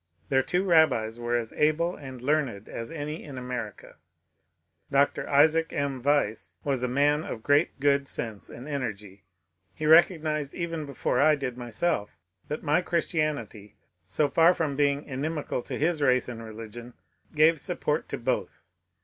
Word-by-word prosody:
Their 135 -1 +4
two 180 +6 0
rabbis 155 - +3
were 120 0 0
as 115 -2 -4
able 160 +3 +1
and 130 -3 -10
learned 130 -8 0
as 115 0 -6
any 150 -1 -5
in 140 -4 -9
America. 125 -5 -6 0.9
Dr. 140 +1 +1
Isaac 160 +3 +4
M. 140 -3 -2
Wise 140 -5 0
was 135 -3 -1
a 125 - 0
man 145 +4 +2
of 110 -7 -6
great 145 +2 +2
good 140 0 +2
sense 110 -6 -4
and 125 +4 -10
energy. 105 - -5 0.5
He 155 - -4
recognized 155 -3 +4
even 165 -3 -4
before 140 - -1
I 155 +1 +5
did 135 -4 -4
myself 120 -1 -2 0.3
that 150 - -4
my 150 +2 +2
Christianity, 155 - -2 0.3
so 95 - 0
far 165 +5 +5
from 150 -4 -1
being 140 0 +1
inimical 145 0 -3
to - - -6
his 160 +1 0
race 130 -3 +3
and 115 -2 -7
religion, 115 +2 -9 0.4
gave 155 +1 +5
support - - -1
to - - -3
both. - - -3
140 Hz, 155 wpm, -27 LUFS, 120-155 Hz, 0.9 s, I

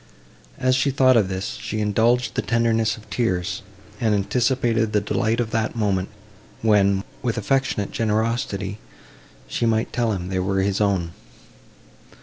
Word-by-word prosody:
As 130 -1 +2
she 135 +2 +2
thought 130 -1 +4
of 105 -5 +3
this, 95 +1 -4
she 110 - -3
indulged 115 +4 +2
the - - 0
tenderness 115 -2 +1
of 110 - -15
tears, 90 -8 -1 0.4
and 110 -3 +2
anticipated 115 +1 +1
the 105 - +4
delight 110 +3 0
of 115 -2 -1
that 110 0 -1
moment, 100 -4 0 0.5
when, 100 -3 +3 0.2
with 120 -2 -1
affectionate 130 -3 0
generosity, 110 -3 -1 0.7
she 115 - -1
might 110 0 0
tell 120 -2 +1
him 90 -3 -3
they 95 -1 -1
were 95 +1 0
his 100 +1 0
own. 95 -5 +1
110 Hz, 145 wpm, -23 LUFS, 100-115 Hz, 0.7 s, thought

